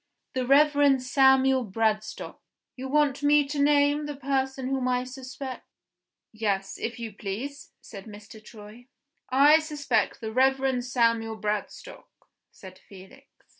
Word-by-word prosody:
"The 255 -1 -2
Reverend 285 -1 +4
Samuel 265 0 +3
Bradstock." 215 0 -2 0.4
"You 260 +1 -6
want 290 -1 +1
me 290 0 +3
to 285 0 -2
name 290 +1 +2
the 295 - -5
person 265 -1 -2
whom 265 -1 -1
I 250 0 0
suspect?" 260 0 -8 0.7
"Yes, 200 -3 -3
if 235 +2 -4
you 225 -3 -6
please," 225 +9 -7
said 195 -3 -11
Mr. 210 0 -13
Troy. 220 +3 -14 0.4
"I 285 +4 +6
suspect 290 -9 -1
the 220 -1 -5
Reverend 265 0 +1
Samuel 230 -3 0
Bradstock," 210 - -5 0.4
said 185 -1 -14
Felix. 200 +9 -16
260 Hz, 130 wpm, -26 LUFS, 220-280 Hz, 0.7 s, I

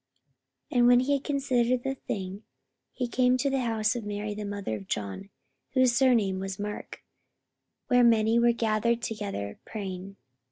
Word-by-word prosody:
44:012:012 250 - +2
And 240 - +6
when 245 0 +7
he 280 +3 +1
had 280 -1 0
considered 255 -4 +1
the 270 - -1
thing, 195 -6 -5 0.5
he 250 - -3
came 250 +1 +2
to 275 +2 0
the 270 - +1
house 225 -2 0
of 240 - -4
Mary 210 0 -4
the 210 0 -5
mother 200 - -3
of 100 -3 -9
John, 105 - -4 0.4
whose 255 -2 +4
surname 230 -7 +3
was 195 0 -4
Mark; 210 0 -6 0.8
where 245 0 +4
many 225 0 +4
were 235 0 +5
gathered 235 0 0
together 200 - -4
praying. 195 -2 -6
225 Hz, 165 wpm, -28 LUFS, 200-250 Hz, 0.8 s, when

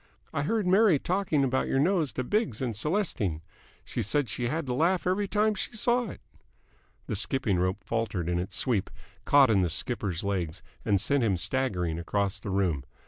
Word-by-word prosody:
I - - 0
heard 210 +7 0
Mary 190 -2 +5
talking 175 -3 0
about 130 0 +1
your - - 0
nose 160 -1 +2
to 130 - -2
Biggs 135 - 0
and 125 -3 -2
Celestine. 115 - -1 0.4
She - - -3
said 140 +4 0
she 120 +4 -2
had 155 +5 -2
to 125 - -2
laugh 170 +7 +1
every 195 +3 +1
time 215 +2 +2
she 210 - -4
saw 240 +1 +1
it." - - -10 0.8
The - - -3
skipping 105 -2 0
rope 95 +1 0
faltered 110 -7 -2
in 85 0 0
its 90 +4 -4
sweep, 115 -8 0 0.4
caught 140 -4 +6
in 100 -3 +4
the 90 - +1
skipper's 95 -1 -1
legs, 90 -4 -2 0.2
and 100 -3 +2
sent 140 +5 +2
him 100 -5 +2
staggering 90 -6 -1
across 100 +3 -1
the 100 - -6
room. 90 -8 0
125 Hz, 190 wpm, -28 LUFS, -, 0.8 s, caught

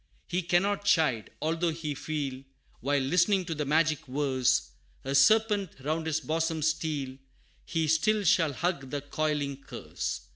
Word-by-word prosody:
He 180 +1 -1
cannot 190 +4 +1
chide; 155 - +2
although 165 +2 +1
he 155 -2 -3
feel, 140 -3 -4 0.4
While 140 +1 +1
listening 180 +6 +2
to 165 - -3
the 150 -1 -3
magic 155 0 +1
verse, 130 -2 +1 0.3
A 135 - -2
serpent 210 +3 +4
round 160 +3 -2
his 160 0 0
bosom 160 0 -1
steal, 150 -4 -1 0.5
He 160 -1 0
still 205 +8 +2
shall 165 -5 +3
hug 160 -3 -2
the 145 +1 -3
coiling 145 -1 -2
curse. 135 -1 -5
155 Hz, 145 wpm, -29 LUFS, 140-170 Hz, 0.5 s, serpent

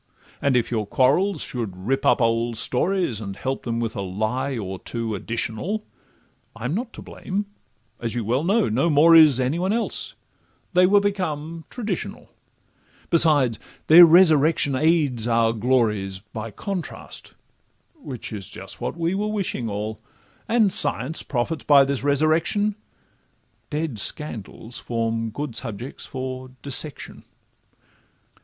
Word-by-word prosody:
And 140 -3 +2
if 120 - -1
your 110 -3 -1
quarrels 150 - +2
should 110 -7 -5
rip 135 +3 0
up - - +4
old 115 0 0
stories, 150 - 0
And 100 -2 -6
help 135 +5 -4
them 115 -1 -2
with 115 -1 -3
a 100 - -3
lie 110 +8 -2
or 95 -3 -5
two 115 -2 -4
additional, 115 - -3 0.7
I'm 125 +5 -3
not 235 +5 -3
to - - -10
blame, 200 +2 -4 0.5
as 115 0 -3
you 120 -3 -2
well 125 +7 0
know—no 170 - +2
more 160 +2 +6
is 155 -5 +7
Any 130 +6 0
one 185 +2 0
else—they 185 -4 -2
were 205 +2 +5
become 165 -5 -3
traditional; 230 -4 -5 0.8
Besides, 150 -9 +4 0.3
their 170 +3 +9
resurrection 160 -4 +5
aids 145 -5 +1
our 115 -1 +2
glories 110 -5 0 0.2
By 110 +1 -5
contrast, 185 - -6 0.6
which 140 - -8
is 100 -3 -6 0.3
what - - -4
we 170 0 0
just 195 - -1
were 210 - -1
wishing 195 - -2
all: 105 +2 -4 0.5
And 225 -4 +3
science 145 +1 0
profits 140 +5 -3
by 140 -2 +7
this 140 -1 -2
resurrection— 160 +9 +2 1.0
Dead 150 -7 -3
scandals 115 -2 -3
form 115 -1 -2
good 140 +1 -5
subjects 120 +2 -5
for 130 0 -6
dissection. 140 +1 -2
135 Hz, 135 wpm, -23 LUFS, 115-165 Hz, 1.0 s, their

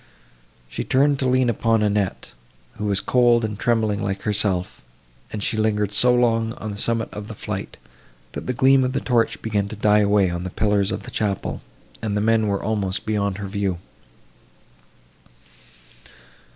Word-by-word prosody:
She - - -4
turned 140 +1 +2
to 130 - +1
lean 130 0 +3
upon 115 -1 +1
Annette, 105 -2 -1 0.5
who 105 - -2
was 100 -2 +1
cold 120 -2 +3
and 105 -1 -5
trembling 110 -4 +1
like 100 -1 -3
herself, 100 -4 0 0.5
and 105 -2 -4
she 110 - -1
lingered 105 -2 +1
so 120 +4 +4
long 115 -2 +1
on 110 -3 -6
the 100 - -7
summit 115 0 0
of 105 0 -7
the 110 - -8
flight, - - -6 0.5
that - - -7
the 130 - 0
gleam 130 +2 +4
of 130 0 -1
the - - 0
torch 120 -3 +1
began 105 -3 -1
to 110 - -7
die 105 0 +3
away 100 -3 +3
on 85 0 -4
the 95 - -4
pillars 100 0 +1
of - - -4
the 125 - -9
chapel, 105 -4 -2 0.4
and 105 -2 -2
the - - +1
men 110 0 +2
were 100 -1 -1
almost 100 -3 -2
beyond 100 -3 -1
her 100 -1 -5
view. 95 -2 -2
105 Hz, 175 wpm, -22 LUFS, 100-115 Hz, 0.5 s, so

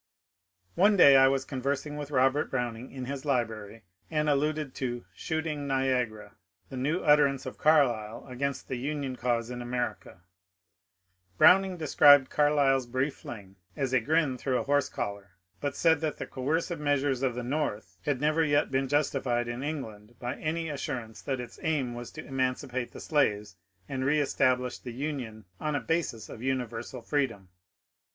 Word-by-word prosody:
One 205 +3 +4
day 140 -6 +8
I 135 0 +7
was 135 0 +1
conversing 140 +3 -3
with 145 -1 -5
Robert 135 +1 +2
Browning 120 -1 -3
in 130 -2 -6
his 135 +1 -5
library 115 -6 -2 0.3
and 150 -1 0
alluded 150 -1 0
to 120 -2 -3
^* - - -25
Shooting 155 +2 -3
Niagara," 125 -6 -1 0.3
the 135 - -7
new 150 +8 0
utter 150 -1 +6
ance 135 -1 -5
of 130 - -7
Carlyle 120 -8 +2
against 135 +2 -3
the 130 - -3
Union 140 -1 -3
cause 120 -1 -1
in 125 0 -5
America. 120 -7 -4 1.2
Brown 190 - +7
ing 185 -2 -5
described 145 -3 +6
Carlyle's 140 -3 +3
brief 130 +4 -1
fling 100 -4 -10 0.2
as 135 -2 -1
^^ - - +4
a - - +5
grin 140 +1 +1
through 130 -2 0
a - - -1
horse 145 0 +1
collar," 100 -1 -5 0.3
but 145 -1 -3
said 160 -3 +3
that 155 -2 -2
the - - -4
coercive 160 +5 -2
measures 145 -3 +1
of 130 -3 0
the 125 - -4
North 125 -5 -3
had 145 -4 0
never 155 +3 +2
yet 145 -3 +2
been 135 0 +1
justified 130 -4 0
in 120 +1 -4
England 120 -7 -6
by 125 +2 -4
any 165 +1 -2
assurance 130 -6 -5
that 135 -2 -3
its 120 -2 -8
aim 140 -6 0
was 120 0 -7
to 155 - -9
emancipate 130 -2 -2
the - - -10
slaves 105 -9 0 0.3
and 130 -1 -3
reestablish 130 -3 +1
the 120 - -8
Union 125 -6 -5
on 150 -1 -1
a - - +1
basis 160 -10 -2
of 110 - -10
universal 125 -2 -3
freedom. 115 -11 -1
135 Hz, 170 wpm, -29 LUFS, 120-145 Hz, 1.2 s, day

